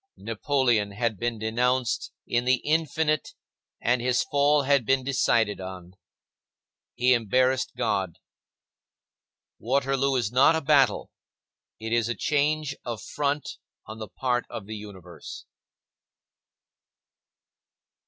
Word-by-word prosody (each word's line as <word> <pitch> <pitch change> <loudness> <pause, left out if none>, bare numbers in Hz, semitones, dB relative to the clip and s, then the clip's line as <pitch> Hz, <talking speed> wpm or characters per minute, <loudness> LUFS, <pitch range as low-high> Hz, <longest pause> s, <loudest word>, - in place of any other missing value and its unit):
Napoleon 115 -3 0
had 110 -1 -2
been 120 -1 -2
denounced 120 +2 0
in 120 +1 0
the 130 +1 +4
infinite 155 0 0 0.4
and 120 +1 +1
his 125 0 +1
fall 145 +1 +2
had 140 -1 +3
been 130 +3 +1
decided 115 -6 +1
on. 95 -1 -9 1.0
He 125 +1 +4
embarrassed 125 +3 +1
God. 100 -8 -1 1.4
Waterloo 135 +2 +1
is 120 -5 0
not 130 +6 +5
a 160 - 0
battle; 140 -2 +3 0.7
it 110 +1 -4
is 115 -1 +1
a 120 - -1
change 150 +3 0
of 115 -3 -5
front 145 0 -3 0.3
on 110 +1 -9
the 110 - -6
part 125 -2 -1
of 105 - -7
the 110 +1 -7
Universe. 95 -4 -10
125 Hz, 115 wpm, -26 LUFS, 110-140 Hz, 1.4 s, not